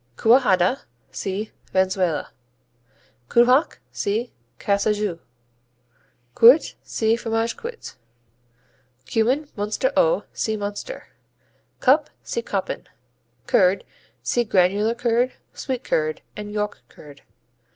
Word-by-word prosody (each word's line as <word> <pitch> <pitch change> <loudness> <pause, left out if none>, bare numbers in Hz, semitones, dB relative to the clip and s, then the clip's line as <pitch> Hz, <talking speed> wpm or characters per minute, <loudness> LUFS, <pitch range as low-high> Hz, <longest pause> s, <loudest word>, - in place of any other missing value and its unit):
Cuajada 225 -2 +4 0.3
see 200 +3 -4 0.2
Venezuela. 185 -4 +1 1.0
Cubjac 250 +5 +4
see 220 +4 -2 0.3
Cajassou. 205 -3 0 1.1
Cuit 245 +7 +6
see 220 0 0
Fromage 225 0 -1
Cuit. 470 0 -8 1.1
Cumin, 250 - +1
Münster 210 - -1
au - - +3
see 220 -1 -1
Münster. 205 - -5 0.8
Cup 285 +3 +4
see 235 - -3
Koppen. 195 -4 -4 0.6
Curd 185 +5 +3 0.4
see 240 - +1
Granular 205 +2 +2
curd, 240 +1 +1 0.2
Sweet 260 -2 -4
curd 155 0 -1
and 210 0 -7
York 210 0 -3
curd. 145 -2 -15
220 Hz, 90 wpm, -23 LUFS, 200-245 Hz, 1.1 s, Cuit